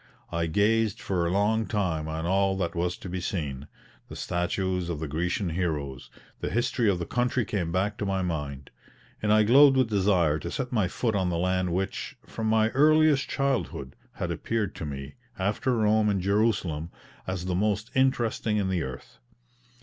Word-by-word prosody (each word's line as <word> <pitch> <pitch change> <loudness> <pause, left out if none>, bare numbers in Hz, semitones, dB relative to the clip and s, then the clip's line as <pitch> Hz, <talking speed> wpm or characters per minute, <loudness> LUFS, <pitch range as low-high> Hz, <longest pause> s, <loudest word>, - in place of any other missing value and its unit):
I 85 -1 0
gazed 105 +5 +2
for 90 -3 -1
a - - -1
long 105 +3 +1
time 85 -8 -1
on 80 +1 -3
all 95 +1 +2
that 85 -3 -1
was 90 +1 -1
to - - -9
be 90 0 -4
seen; 75 -7 -3 0.4
the - - -8
statues 90 0 -1
of 80 -4 -3
the 80 - -3
Grecian 85 +4 -1
heroes, 75 -7 -3 0.3
the - - -3
history 120 -1 +1
of 95 - +2
the 85 - -3
country 120 +1 0
came 90 -6 -2
back 100 +4 -1
to 105 - -1
my 95 -1 0
mind; 75 -6 -4 0.5
and 105 - +1
I 110 0 +6
glowed 135 +5 +7
with 130 -4 +2
desire 95 -6 +2
to - - -5
set 130 -2 -3
my 110 -7 +2
foot 115 +5 -1
on 95 -3 +1
the 85 - -1
land 90 0 0
which, 95 +3 -3
from 110 -1 -4
my 110 0 +3
earliest 155 +2 +4
childhood, 130 - -1 0.2
had - - -3
appeared 110 -4 -2
to 80 - -4
me, 70 0 -6 0.2
after 105 +7 0
Rome 105 0 +3
and 100 -2 +1
Jerusalem, 100 -5 0 0.4
as 95 -1 -3
the 90 - -1
most 105 +3 0
interesting 120 -4 +1
in 100 -2 0
the 90 -2 0
earth. 65 -3 -8
95 Hz, 185 wpm, -27 LUFS, 85-110 Hz, 0.5 s, glowed